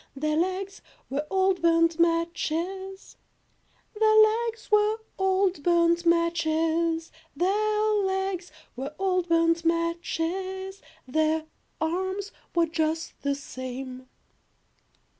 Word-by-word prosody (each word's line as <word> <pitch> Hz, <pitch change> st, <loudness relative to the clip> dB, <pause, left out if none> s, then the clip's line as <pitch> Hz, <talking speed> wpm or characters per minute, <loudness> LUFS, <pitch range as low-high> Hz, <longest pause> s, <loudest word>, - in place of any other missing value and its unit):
Their 305 Hz, +2 st, -1 dB
legs 375 Hz, +4 st, -2 dB, 0.3 s
were 290 Hz, +2 st, -2 dB
old 380 Hz, -1 st, +2 dB
burnt 330 Hz, 0 st, +3 dB
matches, 340 Hz, +3 st, -1 dB, 0.8 s
Their 435 Hz, 0 st, +3 dB, 0.3 s
legs 455 Hz, -1 st, -7 dB
were 425 Hz, +1 st, +4 dB, 0.2 s
old 380 Hz, -3 st, +2 dB
burnt 340 Hz, +1 st, +3 dB
matches, 330 Hz, -1 st, +1 dB, 0.2 s
Their 425 Hz, +5 st, +1 dB
legs 380 Hz, -2 st, -2 dB, 0.2 s
were 275 Hz, +4 st, -6 dB
old 365 Hz, -2 st, 0 dB
burnt 330 Hz, 0 st, +3 dB
matches, 345 Hz, +3 st, -2 dB, 0.2 s
Their 315 Hz, +3 st, +1 dB, 0.3 s
arms 375 Hz, +5 st, -2 dB, 0.2 s
were 340 Hz, -1 st, +4 dB
just 320 Hz, 0 st, -2 dB
the 280 Hz, 0 st, 0 dB
same. 255 Hz, -1 st, -7 dB
340 Hz, 95 wpm, -26 LUFS, 320-380 Hz, 0.8 s, were